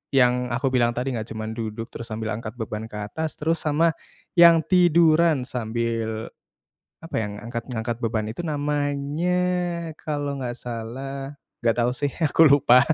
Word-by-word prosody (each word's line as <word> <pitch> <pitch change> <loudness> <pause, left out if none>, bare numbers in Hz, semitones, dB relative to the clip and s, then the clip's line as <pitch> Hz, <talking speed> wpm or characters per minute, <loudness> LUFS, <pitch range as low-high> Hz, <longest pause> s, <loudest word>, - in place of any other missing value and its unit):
yang 125 -1 +4
aku 125 +2 -1
bilang 120 -2 +2
tadi 125 +2 -1
nggak 115 -2 -4
cuman 110 0 -5
duduk 115 0 -5
terus 115 - -7
sambil 110 0 -4
angkat 110 +1 -5
beban 110 -2 -5
ke 105 - -12
atas 125 +10 -4
terus 165 +2 0
sama 160 +2 +2 0.4
yang 170 -3 +7
tiduran 170 -5 +4
sambil 115 -2 -3 0.7
apa, 165 - -5
yang 105 -1 -4
angkat 115 +3 -6
ngangkat 115 0 -3
beban 110 -2 -1
itu 150 - -8
namanya 150 +3 0 0.6
kalau 145 -2 -3
nggak 120 -1 -4
salah 135 +4 -6 0.2
nggak 115 0 +2
tau 120 +1 +2
sih 145 +2 -1 0.2
aku 155 +1 +6
lupa, 135 -3 +6
125 Hz, 155 wpm, -24 LUFS, 115-150 Hz, 0.7 s, yang